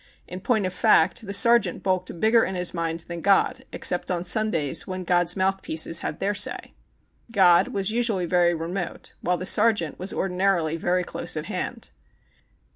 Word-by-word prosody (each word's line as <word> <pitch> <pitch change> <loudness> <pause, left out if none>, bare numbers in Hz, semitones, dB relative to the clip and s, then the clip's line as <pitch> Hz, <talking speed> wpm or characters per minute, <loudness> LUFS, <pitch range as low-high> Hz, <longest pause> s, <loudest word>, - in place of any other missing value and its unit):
In 180 +1 -8
point 220 -2 0
of 185 - -3
fact, 185 +4 +2
the - - -4
sergeant 235 +3 +3
bulked 185 -2 -2
bigger 225 +3 +4
in 190 - -3
his 180 0 -2
mind 165 -1 -3
than 170 0 -8
God, 195 +1 +1
except 180 - -1
on 180 -1 -2
Sundays 185 -12 +1
when 185 0 -5
God's 175 0 +1
mouthpieces 190 -4 0
had 150 - -5
their 200 +2 -1
say. 205 - -2 0.6
God 180 -5 +4
was 195 +1 -2
usually 225 -6 0
very 175 0 +2
remote, 175 +3 -6
vvhile 180 +1 0
the 180 - -6
sergeant 210 -7 +2
was 185 +2 -3
ordinarily 180 -4 0
very 180 +2 0
close - - -4
at - - -4
hand. - - -5
185 Hz, 170 wpm, -24 LUFS, 170-200 Hz, 0.6 s, bigger